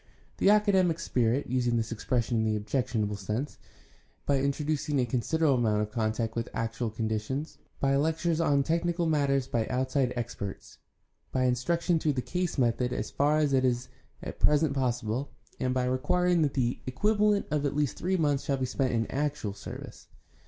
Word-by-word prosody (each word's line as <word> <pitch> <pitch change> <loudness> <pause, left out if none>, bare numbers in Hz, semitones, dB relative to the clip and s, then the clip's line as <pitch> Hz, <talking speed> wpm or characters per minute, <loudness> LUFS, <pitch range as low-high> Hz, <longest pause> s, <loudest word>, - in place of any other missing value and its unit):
The - - +4
academic 195 -5 +4
spirit 125 -3 +1
(using 120 -1 +1
this 115 0 -2
expression 115 +1 -1
in - - +1
the 110 -1 +1
objectionable 105 -1 -1
sense) 105 +8 -3
is - - -21
guarded - - -30
against - - -31
by 140 -1 +2
introducing 145 0 0
a 125 - +2
considerable 135 +4 +1
amount 105 -3 +2
of 105 - -6
contact 110 0 -1
with 115 -1 -2
actual 115 +1 -2
conditions, 110 +6 -3 0.2
by 135 0 +2
lectures 160 +2 +1
on 140 -4 +3
technical 170 +3 0
matters 140 -4 +2
by 115 -2 -1
outside 130 0 0
experts, 115 -5 -6 0.5
by 130 - +1
instruction 165 +7 +1
through 155 -2 +1
the 130 - -1
case 180 -2 -2
method 125 -1 +1
as 125 - -3
far 145 +2 +2
as 150 -3 +2
is 130 -1 +1 0.3
at - - -7
present 150 -1 +3
possible, 125 -1 -1 0.3
and 130 0 0
by 125 -1 +1
requiring 175 +7 +2
that 145 -3 +1
the 125 -3 0
equivalent 210 +8 +2
of 150 -1 +1
at 140 -1 -1
least 145 -3 0
three 185 +1 0
months 145 -4 +1
shall 140 - 0
be 130 - -1
spent 130 0 -1
in 115 -1 +1
actual 140 -7 -2
service. - - -9
130 Hz, 180 wpm, -29 LUFS, 120-150 Hz, 0.5 s, The